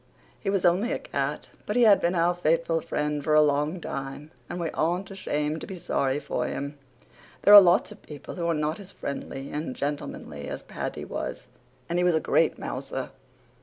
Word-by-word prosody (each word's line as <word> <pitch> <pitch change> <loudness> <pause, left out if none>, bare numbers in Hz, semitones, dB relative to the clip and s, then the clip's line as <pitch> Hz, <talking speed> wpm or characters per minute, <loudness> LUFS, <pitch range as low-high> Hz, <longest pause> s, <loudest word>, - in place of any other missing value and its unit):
He 200 - -2
was 195 -2 +1
only 185 +8 +3
a - - 0
cat, - - -3 0.2
but 210 - -1
he 245 - +5
had 210 -3 +6
been 175 +2 +1
our 170 +1 +3
faithful 165 -1 +1
friend 150 -1 -2
for 155 +1 +2
a 155 - +8
long 150 +4 +1
time 135 0 -6 0.2
and 180 - -4
we 165 -2 -2
aren't 180 +5 -1
ashamed 150 -5 -2
to - - -7
be 190 - -6
sorry 140 -5 0
for - - -2
him. 140 +1 -4 0.7
There 205 - +7
are 205 - +14
lots 180 +3 +3
of 210 - -12
people 150 -2 -9
who 170 -2 -2
are 165 - +2
not 150 +4 -1
as 195 -1 -11
friendly 140 -1 -6
and 150 -3 -4
gentlemanly 140 - -4
as - - -5
Paddy - - -5
was, - - -5 0.4
and 170 +3 0
he - - +2
was 175 -2 +3
a - - +3
great - - +2
mouser. - - -5
165 Hz, 205 wpm, -27 LUFS, 150-180 Hz, 0.7 s, are